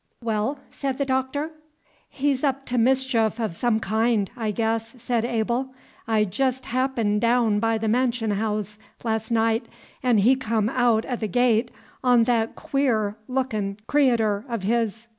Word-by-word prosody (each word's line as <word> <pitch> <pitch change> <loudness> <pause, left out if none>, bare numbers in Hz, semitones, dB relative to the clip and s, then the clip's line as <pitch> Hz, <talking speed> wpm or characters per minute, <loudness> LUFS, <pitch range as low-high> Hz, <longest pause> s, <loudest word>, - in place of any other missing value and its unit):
"Well?" 225 +5 -1
said 270 -2 -3
the 280 - 0
Doctor. 265 +4 -1 0.6
"He's 275 -1 -1
up 275 -1 0
to 245 0 0
mischief 240 -2 +2
o' 220 -2 0
some 220 +6 0
kind, 220 -1 +1
I 225 -3 -2
guess," 225 +2 -1
said 240 -1 -1
Abel. 240 +3 -1 0.3
"I 220 -2 +2
jest 260 +6 -1
happened 235 -5 0
daown 230 -3 +3
by 225 +1 +1
the 220 0 -2
mansion 235 -1 +1
haouse 210 0 -2 0.2
last 220 -1 -1
night, 225 0 +1 0.3
'n' 250 -4 +3
he 230 +6 +5
come 225 -4 0
aout 240 -3 +2
o' 250 - -2
the 220 -2 -3
gate 240 +2 +2 0.3
on 245 -2 +5
that 225 -1 0
queer 250 -9 0
lookin' 220 -7 -2
creator' 230 -8 +2
o' 235 - -1
his. 225 +2 -1
230 Hz, 155 wpm, -24 LUFS, 220-255 Hz, 0.6 s, he